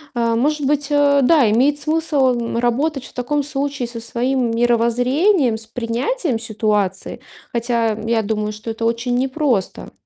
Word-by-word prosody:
Э, 230 -1 +1
может 290 +4 0
быть, 290 0 0
э, 285 -1 +3
да, 285 -2 +4
имеет 280 +6 +2
смысл, 305 -3 +1
м, 235 -1 -2
работать 260 +4 0
в - - -12
таком 280 +4 -1
случае 275 -3 -3
со 235 -1 -7
своим 245 +2 -1
мировоззрением, 240 - +2
с 220 - -5
принятием 245 - -2
ситуации. 210 -4 -2 0.3
Хотя 235 -1 0
я 225 -1 0
думаю, 210 0 -2
что 215 +2 -6
это 225 +1 -6
очень 235 +2 0
непросто. 260 - -1
245 Hz, 150 wpm, -19 LUFS, 230-285 Hz, 0.3 s, да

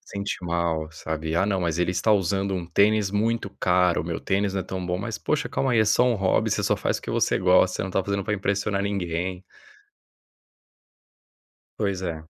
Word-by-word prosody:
Sente 100 0 -4
mal, 85 -2 -1
sabe, 80 0 -4
"Ah 85 - +3
não, 95 -3 0
mas 85 -1 -1
ele 90 0 +1
está 110 +4 +2
usando 95 0 +1
um 90 -2 -3
tênis 100 +3 +3
muito 110 0 0
caro, 90 -2 +3
o - - -8
meu 85 0 -4
tênis 100 0 0
não 95 - 0
é - - -2
tão 95 -1 -5
bom", 90 0 -1
mas 110 +3 -4
poxa, 155 - -1
calma 135 -2 0
aí, 115 - +4
é - - +4
só 110 +4 +3
um 125 -1 +3
hobby 95 -3 +1
você - - 0
só - - +2
faz - - -1
porque - - -7
você - - +1
gosta, 90 0 +4
você - - -2
não 95 - -4
tá 95 +1 0
fazendo 100 0 -1
pra 105 +1 -1
impressionar 100 0 -1
ninguém. 90 -2 -2 2.4
Pois 100 -3 -1
é. 80 -3 -4
95 Hz, 210 wpm, -25 LUFS, 90-100 Hz, 2.4 s, aí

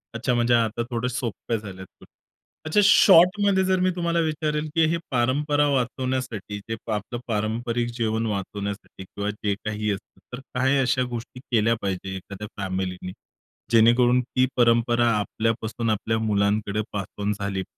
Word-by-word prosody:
अच्छा! 125 +2 0
म्हणजे 120 0 +2
आता 115 0 +1
थोडे 120 0 -1
सोप्या 120 -3 -3
झाल्यात. 95 -3 -11 0.6
अच्छा, 155 +6 +2
शॉर्टमध्ये 195 0 +6
जर 185 0 +2
मी 185 0 +2
तुम्हाला 170 -1 0
विचारेल, 155 -1 -1
की 165 -1 +4
हे 170 - +1
परंपरा 145 +4 +2
वाचवण्यासाठी, 130 -5 -2
जे 115 - -1 0.2
आपलं 110 +4 -4
पारंपारिक 115 +2 -1
जीवन 115 -1 -1
वाचवण्यासाठी 100 -1 -5
किंवा 100 +2 -5
जे 105 -1 -2
काही 105 0 -1
असतं. 100 -1 -7
तर 125 - -5 0.2
काही 130 +2 +2
अशा 130 0 +2
गोष्टी 120 +2 -8
केल्या 115 0 +3
पाहिजे 95 0 -3
एखाद्या 100 +2 -8
फॅमिलीनी 95 -1 -3 0.6
जेणेकरून 120 +2 +5
ती 125 +1 +1
परंपरा 120 0 +3
आपल्यापासून 115 +2 -2
आपल्या 110 +1 0
मुलांकडे 105 -1 0
पास 100 -2 -2 0.2
ऑन 100 +1 0
झाली. 100 -1 -2
115 Hz, 140 wpm, -24 LUFS, 105-130 Hz, 0.6 s, शॉर्टमध्ये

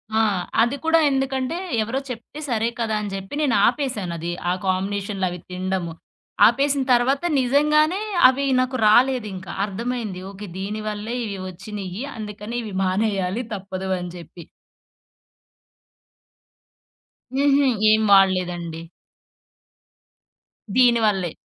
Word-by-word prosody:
ఆ! - - +4 0.4
అది 240 +4 0
కూడా 325 0 +4
ఎందుకంటే, 270 +3 -1 0.3
ఎవరో 245 +5 -2
చెప్తే 250 +5 -8
సరే 230 0 +1
కదా! 220 -2 0
అని 205 -1 -5
జెప్పి 195 +7 -6
నేనాపేశానది. 210 - 0 0.2
ఆ - - +2
కాంబినేషన్లవి 190 -1 -1
తినడము. 185 -2 -3 0.5
ఆపేసిన 275 +3 +2
తర్వాత 265 +6 +2 0.2
నిజంగానే 300 +8 +3 0.3
అవి 275 +2 -1
నాకు 255 0 0
రాలేదింక. 215 -5 +2 0.2
అర్థమైంది. 220 -2 -4
ఓకే. 200 +1 -9
దీనివల్లే 215 +3 -4
ఇవి 200 -3 -5
వచ్చినయి. 190 +3 -7
అందుకని 210 +2 -6
ఇవి 210 -3 -7
మానేయాలి 195 +2 0
తప్పదు 190 -1 -5
అని 180 0 -5
జెప్పి. 170 0 -11 2.9
హుహు. 280 0 +3 0.2
ఏం 215 0 +4
వాడలేదండి. 180 -4 +2 1.9
దీనివల్లే. 220 -8 +3
215 Hz, 100 wpm, -22 LUFS, 190-255 Hz, 2.9 s, ఆ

